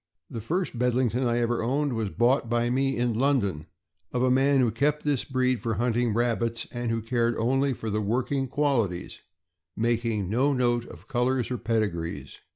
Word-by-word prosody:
The 115 Hz, -, -5 dB
first 165 Hz, -, -2 dB
Bedlington 125 Hz, 0 st, +1 dB
I 120 Hz, 0 st, +1 dB
ever 120 Hz, 0 st, 0 dB
owned 135 Hz, +4 st, 0 dB
was 110 Hz, -3 st, -2 dB
bought 120 Hz, +3 st, +2 dB
by 120 Hz, 0 st, +1 dB
me 135 Hz, +1 st, +1 dB
in 120 Hz, -1 st, +1 dB
London, 110 Hz, -, 0 dB, 0.4 s
of 125 Hz, 0 st, 0 dB
a 130 Hz, -, +3 dB
man 135 Hz, +2 st, +3 dB
who 120 Hz, -3 st, +3 dB
kept 150 Hz, +4 st, 0 dB
this 145 Hz, -4 st, +1 dB
breed 130 Hz, -2 st, 0 dB
for 115 Hz, -2 st, -1 dB
hunting 120 Hz, +2 st, +1 dB
rabbits, 115 Hz, -1 st, 0 dB
and 120 Hz, -1 st, -3 dB
who 115 Hz, -1 st, -1 dB
cared 115 Hz, 0 st, 0 dB
only 135 Hz, +4 st, +1 dB
for 110 Hz, -3 st, -3 dB
working 130 Hz, +5 st, -1 dB
qualities, 120 Hz, -11 st, -1 dB, 0.6 s
making 115 Hz, -3 st, 0 dB
no 130 Hz, +8 st, +2 dB
note 120 Hz, -2 st, +1 dB
of -, -, -13 dB
colors 130 Hz, -1 st, 0 dB
or 125 Hz, -, -2 dB
pedigrees. 100 Hz, -8 st, -2 dB
120 Hz, 170 wpm, -26 LUFS, 115-130 Hz, 0.6 s, a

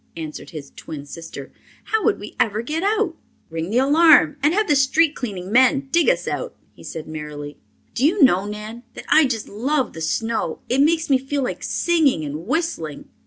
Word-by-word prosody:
answered 155 Hz, -2 st, -7 dB
his 150 Hz, -4 st, -9 dB
twin 145 Hz, -3 st, -8 dB
sister. 145 Hz, -2 st, -9 dB, 0.3 s
"How 440 Hz, 0 st, -1 dB
would 440 Hz, -, +2 dB
we 210 Hz, -, -9 dB
ever 215 Hz, 0 st, +1 dB
get 310 Hz, +6 st, -3 dB
out?" 405 Hz, -3 st, 0 dB, 0.4 s
"Ring 165 Hz, +2 st, -4 dB
the 225 Hz, -, 0 dB
alarm 295 Hz, +2 st, +5 dB
and 295 Hz, +2 st, +3 dB
have 425 Hz, +4 st, +1 dB
the 295 Hz, -, +3 dB
street 285 Hz, +4 st, +3 dB
cleaning 195 Hz, -8 st, -6 dB
men 260 Hz, +3 st, +3 dB
dig 340 Hz, +4 st, +4 dB
us -, -, 0 dB
out," -, -, -4 dB, 0.2 s
he -, -, -16 dB
said 160 Hz, -, -7 dB
merrily. 150 Hz, -1 st, -7 dB, 0.3 s
"Do 245 Hz, -, -2 dB
you 325 Hz, +3 st, +4 dB
know, 195 Hz, -6 st, +4 dB
Nan, 210 Hz, +3 st, -7 dB
that -, -, -9 dB
I 310 Hz, -3 st, +6 dB
just 225 Hz, -4 st, -3 dB
love 260 Hz, +6 st, -1 dB
the 160 Hz, -, -8 dB
snow. 225 Hz, +8 st, -1 dB
It 260 Hz, +3 st, +2 dB
makes 325 Hz, +2 st, +2 dB
me 265 Hz, -, +5 dB
feel 270 Hz, +1 st, -2 dB
like -, -, -4 dB
singing 310 Hz, -, +1 dB
and 150 Hz, +5 st, -6 dB
whistling." 265 Hz, -, -3 dB
255 Hz, 195 wpm, -21 LUFS, -, 0.4 s, I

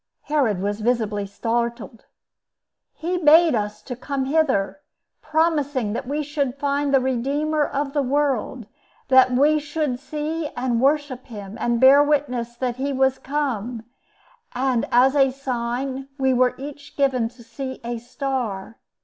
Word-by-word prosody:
Herod 265 Hz, -10 st, +1 dB
was 205 Hz, +1 st, -2 dB
visibly 215 Hz, -3 st, 0 dB
startled. 235 Hz, +2 st, -3 dB, 0.9 s
"He 355 Hz, +2 st, -2 dB
bade 320 Hz, +1 st, +6 dB
us 210 Hz, -2 st, -2 dB, 0.2 s
come 275 Hz, 0 st, -2 dB
hither, 275 Hz, -7 st, +1 dB, 0.4 s
promising 290 Hz, -8 st, 0 dB
that 240 Hz, -, -4 dB
we 295 Hz, +2 st, -1 dB
should 280 Hz, -3 st, -2 dB
find 285 Hz, 0 st, 0 dB
the 270 Hz, -, +5 dB
Redeemer 280 Hz, +5 st, 0 dB
of 275 Hz, 0 st, -3 dB
the 290 Hz, -, +2 dB
World; 265 Hz, -3 st, -1 dB, 0.4 s
that 260 Hz, -1 st, +6 dB
we 290 Hz, +5 st, +4 dB
should 290 Hz, -3 st, -2 dB
see 305 Hz, +2 st, -3 dB
and 245 Hz, -2 st, 0 dB
worship 275 Hz, -2 st, +1 dB
him, 205 Hz, -4 st, -8 dB
and 235 Hz, -1 st, +1 dB
bear 270 Hz, +3 st, +8 dB
witness 255 Hz, -5 st, -1 dB
that 245 Hz, 0 st, -2 dB
he 275 Hz, +2 st, -2 dB
was 265 Hz, -1 st, +1 dB
come; 250 Hz, -5 st, -3 dB, 0.7 s
and, 255 Hz, -2 st, 0 dB
as 260 Hz, +3 st, +5 dB
a 270 Hz, -2 st, +5 dB
sign, 260 Hz, 0 st, -3 dB
we 265 Hz, -1 st, +2 dB
were 250 Hz, 0 st, +2 dB
each 290 Hz, +1 st, -10 dB
given 260 Hz, -5 st, +1 dB
to 240 Hz, 0 st, -17 dB
see 260 Hz, +3 st, -6 dB
a 235 Hz, 0 st, -4 dB
star. 240 Hz, -5 st, -4 dB
265 Hz, 140 wpm, -23 LUFS, 240-290 Hz, 0.9 s, bear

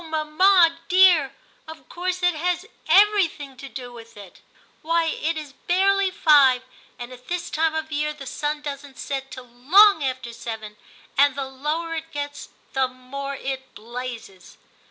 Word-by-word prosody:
mamma 330 Hz, +2 st, +3 dB
dear, 360 Hz, -7 st, +5 dB, 0.4 s
of 320 Hz, 0 st, -12 dB
course 365 Hz, +1 st, -4 dB
it 355 Hz, 0 st, +3 dB
has 355 Hz, +4 st, -2 dB, 0.2 s
every 410 Hz, -1 st, +5 dB
thing 285 Hz, -4 st, -11 dB
to 275 Hz, +1 st, -10 dB
do 245 Hz, -2 st, -8 dB
with 230 Hz, -2 st, -13 dB
it; 200 Hz, -3 st, -13 dB, 0.4 s
why, 330 Hz, +1 st, +1 dB
it 325 Hz, 0 st, -2 dB
is 300 Hz, -3 st, -8 dB
barely 390 Hz, +2 st, +3 dB
five, 285 Hz, -9 st, +4 dB, 0.3 s
and 245 Hz, +1 st, -8 dB
at 250 Hz, 0 st, -15 dB
this 355 Hz, 0 st, -4 dB
time 320 Hz, 0 st, 0 dB
of 315 Hz, 0 st, -4 dB
year 300 Hz, 0 st, -1 dB
the 290 Hz, -2 st, -10 dB
sun 295 Hz, +3 st, -3 dB
doesn't 280 Hz, -1 st, -7 dB
set 270 Hz, -1 st, -5 dB
till 255 Hz, -, -9 dB
long 305 Hz, -, +5 dB
after 255 Hz, -3 st, -4 dB
seven, 220 Hz, -2 st, -7 dB, 0.4 s
and 285 Hz, -1 st, +5 dB
the 275 Hz, -1 st, -3 dB
lower 300 Hz, +5 st, -4 dB
it 325 Hz, 0 st, -6 dB
gets 290 Hz, 0 st, -6 dB, 0.2 s
the 265 Hz, -1 st, +1 dB
more 265 Hz, +2 st, -7 dB
it 265 Hz, -1 st, -6 dB
blazes.' 230 Hz, -4 st, -9 dB
290 Hz, 160 wpm, -23 LUFS, 260-330 Hz, 0.4 s, dear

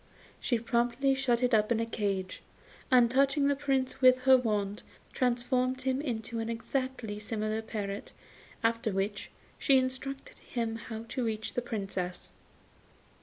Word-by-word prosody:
She 240 Hz, -, +1 dB
promptly 240 Hz, +4 st, +1 dB
shut 255 Hz, -3 st, +1 dB
it 250 Hz, 0 st, +2 dB
up 215 Hz, +1 st, +3 dB
in 230 Hz, -, +3 dB
a 230 Hz, -, +1 dB
cage, 200 Hz, -4 st, -2 dB, 0.5 s
and, 250 Hz, -2 st, +6 dB
touching 275 Hz, +2 st, +3 dB
the 285 Hz, -, +3 dB
Prince 270 Hz, -2 st, -1 dB
with 255 Hz, 0 st, +6 dB
her 265 Hz, 0 st, +8 dB
wand, 210 Hz, -4 st, 0 dB, 0.3 s
transformed 255 Hz, +1 st, +1 dB
him 265 Hz, +1 st, 0 dB
into 235 Hz, -4 st, -3 dB
an 225 Hz, 0 st, -2 dB
exactly 230 Hz, -2 st, -3 dB
similar 215 Hz, 0 st, -2 dB
parrot; 205 Hz, -2 st, -5 dB, 0.5 s
after 230 Hz, -1 st, +1 dB
which, 195 Hz, +1 st, -2 dB, 0.3 s
she 275 Hz, -, +5 dB
instructed 260 Hz, +1 st, -3 dB
him 230 Hz, -2 st, -3 dB
how 225 Hz, -1 st, -7 dB
to 255 Hz, 0 st, -2 dB
reach 220 Hz, -1 st, -2 dB
the 245 Hz, -, 0 dB
Princess. 195 Hz, -6 st, -4 dB
235 Hz, 145 wpm, -30 LUFS, 220-260 Hz, 0.5 s, her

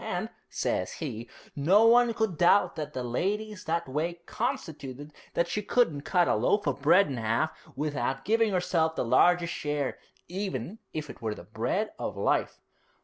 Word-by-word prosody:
And," -, -, -3 dB, 0.2 s
says -, -, -1 dB
he, 115 Hz, +2 st, -6 dB, 0.3 s
"no 185 Hz, +10 st, +5 dB
one 235 Hz, 0 st, +5 dB
could 220 Hz, -6 st, 0 dB
doubt 175 Hz, +5 st, +4 dB
that 150 Hz, -1 st, -5 dB
the 130 Hz, -, -3 dB
lady's 205 Hz, -, -2 dB
that 170 Hz, 0 st, -1 dB
way 165 Hz, +5 st, -2 dB
constituted 155 Hz, -, -4 dB, 0.2 s
that 170 Hz, -, +2 dB
she 210 Hz, +4 st, -2 dB
couldn't 205 Hz, -10 st, +1 dB
cut 175 Hz, +3 st, +2 dB
a -, -, +3 dB
loaf 125 Hz, -, +2 dB
of 140 Hz, -2 st, -1 dB
bread 170 Hz, +7 st, +6 dB
in 135 Hz, -4 st, -4 dB
'alf 115 Hz, +8 st, +1 dB, 0.2 s
without 135 Hz, -2 st, -2 dB
giving 225 Hz, 0 st, +3 dB
herself 175 Hz, -3 st, +1 dB
the -, -, -1 dB
largest 170 Hz, +8 st, +4 dB
share, 145 Hz, -2 st, -2 dB, 0.3 s
even 185 Hz, -, -4 dB
if 155 Hz, -1 st, -4 dB
it -, -, -16 dB
were 110 Hz, -2 st, -2 dB
the -, -, -10 dB
bread 125 Hz, -, -2 dB
of -, -, -4 dB
life."' -, -, 0 dB
160 Hz, 170 wpm, -28 LUFS, 135-200 Hz, 0.3 s, bread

